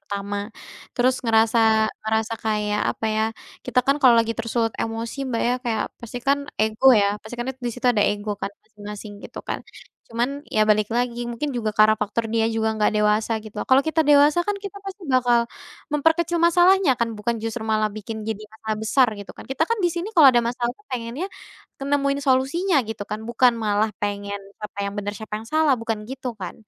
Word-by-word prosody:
pertama. 200 0 -3 0.6
Terus 255 +1 +4
ngerasa 225 0 +3 0.4
ngerasa 220 +1 0
kayak, 210 -1 0
apa 220 - -4
ya, 220 - +2 0.4
kita 250 0 0
kan 275 +1 +3
kalau 250 -3 +8
lagi 230 0 +2
tersulut 230 0 -1
emosi 225 +3 -4
Mbak 230 - -1
ya, 250 - +2
kayak 220 -3 0 0.2
pastikan 245 +4 -1 0.2
ego 220 +4 +1
ya, 200 - +3 0.2
pasti 220 +3 -8
kan 240 - -2
det 265 - -4
di 240 - 0
situ 250 0 -3
ada 210 - +2
ego 205 +1 -4
kan, - - -2
masing-masing 210 -1 -9
gitu - - -8
kan. - - -3 0.5
Cuman, 255 +6 -3
ya 215 - +4
balik 210 0 +3
lagi 240 0 -1
mungkin 240 +5 -3
juga 220 -4 -2
karena 215 0 +5
faktor 220 +2 -2
dia 225 0 +2
juga 225 -1 0
nggak 210 - +3
dewasa 210 +1 +2
gitu. 215 -1 -10
Kalau 265 +1 +5
kita 320 +1 0
dewasa 295 +2 +6
kan 415 - +1
kita 400 0 -8
pasti 390 0 -7
bakal 240 -2 +3 0.4
memperkecil 325 +3 +2
masalahnya 350 -1 +5
kan, 235 -1 -1
bukan 225 +1 -2
justru 225 0 -4
malah 215 -1 +1
bikin 215 +1 -7
jadi 220 -1 -3 0.2
masalah 220 -1 -4
besar 235 +4 +3
gitu 200 - -9
kan. - - -10
Kita 270 +5 +1
kan 460 - +1
di 350 - +3
sini 350 +6 -5
kalau 300 -7 +8
ada 240 - +3
masalah 240 +1 -1 0.2
pengennya, 250 +7 -4 0.5
kan 275 - -5
nemuin 280 0 +1
solusinya 280 +7 +2
gitu 220 -1 -5
kan. 215 +1 -4
Bukan 245 +1 +4
malah 215 0 +1
pengen 200 0 -2 0.2
siapa 210 -1 -8
yang 200 - -5
benar, 205 0 -3
siapa 220 -1 -7
yang 225 - -13
salah, 310 -3 +4
bukan 225 -2 -4
gitu 250 -4 -6
kan. 185 -3 -6
230 Hz, 195 wpm, -23 LUFS, 215-265 Hz, 0.6 s, kalau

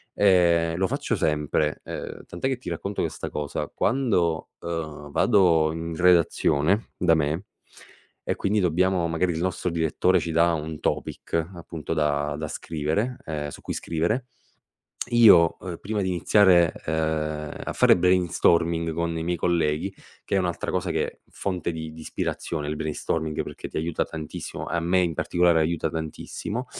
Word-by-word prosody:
ehm, 85 -4 +4
lo 95 +1 +1
faccio - - -1
sempre. 75 0 0
Uhm, - - -7
tant'è 85 +9 -3
che 130 - -1
ti 125 - -7
racconto 100 0 -4
questa - - -3
cosa, 75 -1 -4
quando, 100 -10 +1
uhm, 80 -3 -5
vado 85 -7 +4
in 80 +1 -5
redazione 90 +1 +3
da 90 -2 +3
me 80 +5 -1 0.8
e - - 0
quindi 105 +1 +1
dobbiamo 90 +1 +2
magari 85 +2 0
il 80 - -3
nostro 90 0 -1
direttore 85 +2 +2
ci 85 0 -3
dà 85 +1 +3
un 80 -1 -4
topic - - -3 0.2
appunto 80 -2 -5
da 75 -2 0
da 80 +1 -4
scrivere 80 +12 -2
ehm, 75 -2 -3
su - - -10
cui - - -4
scrivere, 100 +11 -1 0.8
io 105 -9 +6 0.2
prima 105 +1 -2
di 95 - -1
iniziare, 90 0 +4
uhm, 75 -1 -1
a - - -3
fare - - +6
brainstorming 85 -2 +2
con 85 0 -1
i - - -2
miei 90 +1 0
colleghi, 85 +2 0 0.3
che - - 0
è - - +4
un'altra 90 -2 -2
cosa - - -1
che - - -2
fonte 90 -3 -3
di 80 -1 -6
di 80 - -11
ispirazione 75 -1 -3
il 75 - -2
brainstorming 80 0 -2
perché - - -8
ti - - -10
aiuta 80 +1 -1
tantissimo, 80 -2 -6
a 85 - -1
me 90 +3 +2
in 85 -2 +1
particolare 85 +1 +2
aiuta 80 +1 0
tantissimo. 85 +9 -5
85 Hz, 155 wpm, -25 LUFS, 80-90 Hz, 0.8 s, io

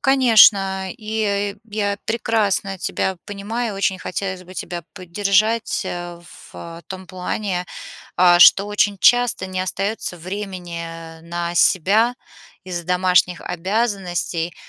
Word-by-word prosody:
Конечно, 210 -8 +4
и 210 -3 -2
я 210 -2 -2
я 200 - -6
прекрасно 210 -4 0
тебя 190 +1 -2
понимаю, 210 +2 -4
очень 195 -1 0
хотелось 185 -1 -4
бы 185 +1 -13
тебя 175 -1 -5
поддержать, 200 +5 0
а, 175 -1 -6 0.3
в 170 0 -10
том 190 -2 -8
плане, 185 0 -3 0.5
а, 175 -1 +6
что 200 +3 +7
очень 205 -1 0
часто 245 -5 +3
не 185 0 -4
остается 195 0 -3
времени 170 -3 -7
на 170 +1 -4
себя 205 +8 +3 0.5
из-за 175 -2 -5
домашних 180 0 +2
обязанностей, 180 -3 -2
190 Hz, 115 wpm, -20 LUFS, 175-210 Hz, 0.5 s, что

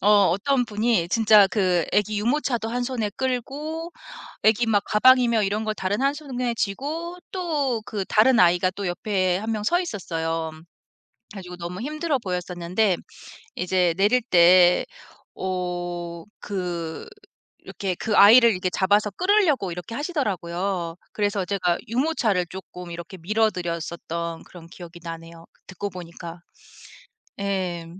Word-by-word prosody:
어 200 - +2 0.2
어떤 245 +9 +1
분이 215 -5 0
진짜 215 0 +6
그 185 -3 +1
애기 210 0 +1
유모차도 240 0 0
한 245 +2 -2
손에 240 -5 -2
끌고 290 +6 -3 0.5
애기 220 +2 +3
막 205 -3 +2
가방이며 235 0 +4
이런 205 +2 -1
걸 215 - -1
다른 200 +2 -2
한 275 +1 +2
손에 250 -5 -3
쥐고 300 - -3
또 295 - -1
그 205 -3 -3
다른 230 +5 +4
아이가 180 +1 +4
또 200 -1 -4
옆에 185 0 0
1명 215 +1 -3
서 350 +11 +2
있었어요. 165 - -3
그래 155 - -14 0.8
가지고 180 -2 -8
너무 175 +1 -6
힘들어 305 +1 -1
보였었는데 180 0 -1 0.6
이제 180 -1 +1
내릴 210 +6 +3
때 180 -3 +5 0.5
어 175 -2 -4 0.2
그 175 -5 -5 0.6
이렇게 190 -3 -4
그 215 +3 -2
아이를 235 +4 +8
이렇게 185 -2 -1
잡아서 205 +3 +2
끌려고 350 - +2
이렇게 180 +5 -7
하시더라고요. 190 - -2 0.2
그래서 205 -2 -1
제가 180 -3 0
유모차를 230 - 0
쪼끔 180 -1 -9
이렇게 170 +2 -8
밀어 215 +6 +1
드렸었던 170 -1 -5
그런 170 -2 -13
기억이 175 0 -12
나네요, 165 0 -9
그 - - -34
듣고 200 +2 -5
보니까. 170 -1 -9 1.0
예. 185 -4 -2
200 Hz, 285 characters per minute, -24 LUFS, 175-235 Hz, 1.0 s, 아이를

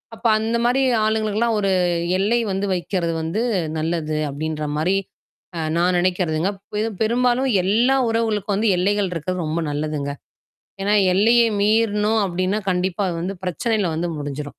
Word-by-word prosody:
அப்ப 240 - -19
அந்த 225 +2 0
மாரி 255 +3 +2 0.2
ஆளுங்களுக்கெல்லாம் 220 +1 0
ஒரு 195 -1 +1 0.5
எல்லை 225 +5 +2
வந்து 195 +1 -1
வைக்கிறது 175 -1 -2
வந்து 165 +7 -2 0.4
நல்லது 155 -1 -2
அப்டின்ற 155 +1 -4
மாரி, 180 +6 +1 0.6
அ - - -2 0.2
நான் 180 +1 +2
நெனைக்கிறதுங்க. 180 0 0 0.3
து 225 - -1
பெரும்பாலும் 250 +3 +1
எல்லா 235 +8 +3
உறவுகளுக்கும் 215 -3 0
வந்து 210 0 +2
எல்லைகள் 200 +1 +1
இருக்கிறது 175 +2 -3
ரொம்ப 160 +2 -1
நல்லதுங்க. 145 -1 -3 0.7
ஏனா, 205 +1 +1 0.2
எல்லைய 230 +5 +4 0.2
மீறுனோம் 215 0 +2
அப்டின்னா, 185 +4 -1
கண்டிப்பா 180 +1 -1
அது 170 - -3
வந்து 190 +2 -4
பிரச்சனையில 190 0 -1
வந்து 170 +1 -2
முடிஞ்சிரும். 145 0 -4
195 Hz, 140 wpm, -21 LUFS, 170-220 Hz, 0.7 s, எல்லைய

